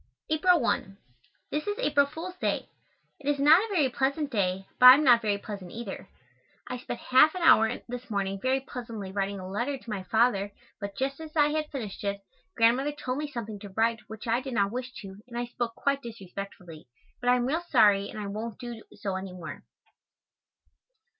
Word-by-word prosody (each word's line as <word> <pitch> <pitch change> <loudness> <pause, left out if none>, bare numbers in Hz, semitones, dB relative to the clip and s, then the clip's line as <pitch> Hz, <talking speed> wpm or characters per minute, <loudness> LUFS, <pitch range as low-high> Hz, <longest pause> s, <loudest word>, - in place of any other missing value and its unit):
April 345 +3 +4
1. 195 -5 -1 0.5
This 300 +6 -2
is 415 0 -1
April 285 -1 +3
Fool's 335 +5 -7
Day. - - -1 0.5
It 290 0 -3
is 290 - +2
not 305 +7 +6
a - - -3
very 315 -8 +3
pleasant 275 +3 -1
day, 190 -3 0
but 250 - +10
I 255 - +14
am 300 - +1
not 240 -4 +6
very 210 -2 0
pleasant 200 -3 -8
either. 205 -4 -7 0.6
I 250 0 -4
spent 240 - -6
half 300 +6 +5
an 365 - -3
hour 225 -8 +6 0.2
this 245 0 -7
morning 195 -2 -2
very 260 +1 +1
pleasantly 230 -7 -7
writing 200 0 -2
a 185 - -7
letter 240 +9 -2
to 245 - -14
my 200 -2 -3
Father 205 0 +1 0.3
but 200 -1 -6
just 275 +3 -2
as 315 0 -9
I 295 -1 +4
had 305 0 -2
finished 220 -9 -6
it, 200 0 -2 0.4
Grandmother 250 +6 +3
told 265 -2 -4
me 300 - -2
something 220 -5 -5
to 205 0 -9
write 225 +3 +1
which 220 0 -9
I 230 +2 +2
did 265 -2 -5
not 200 -1 +2
wish 250 +2 -4
to 195 +1 -10
and 240 -1 -8
I 240 - -1
spoke 240 -1 -4
quite 280 0 0
disrespectfully, 195 - -9 0.3
but 245 - 0
I 250 - +6
am 245 -1 0
real 310 +6 0
sorry 205 -11 +4
and - - -9
I 210 - -4
won't 215 +2 -5
do 240 -3 -7
so 195 -2 -3
any 190 -1 -6
more. 180 -3 -8
235 Hz, 205 wpm, -28 LUFS, 200-275 Hz, 0.6 s, I